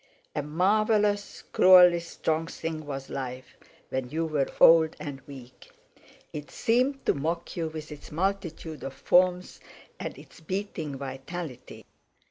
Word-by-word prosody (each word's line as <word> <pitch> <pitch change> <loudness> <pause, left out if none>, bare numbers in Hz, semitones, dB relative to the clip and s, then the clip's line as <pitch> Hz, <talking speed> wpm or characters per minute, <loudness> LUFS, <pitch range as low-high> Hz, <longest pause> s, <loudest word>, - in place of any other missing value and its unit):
A 150 - 0
marvellous 205 +6 +1
cruelly 180 -2 +7
strong 165 -1 -2
thing 160 -2 -5
was 135 -1 -5
life 130 -1 -6 0.3
when 130 -1 -3
you 160 +4 -1
were 150 -4 0
old 160 -1 +7
and 140 -2 -6
weak; 130 -3 -13 0.6
it 150 -1 -6
seemed 255 +4 0
to - - +3
mock 165 +4 -3
you 165 -2 -1
with 155 0 -8
its 150 - -10
multitude 170 -2 -3
of 135 - -5
forms 180 0 +2 0.4
and - - -5
its - - -15
beating 160 -4 -4
vitality. 135 +1 -7
160 Hz, 130 wpm, -27 LUFS, 145-180 Hz, 0.6 s, cruelly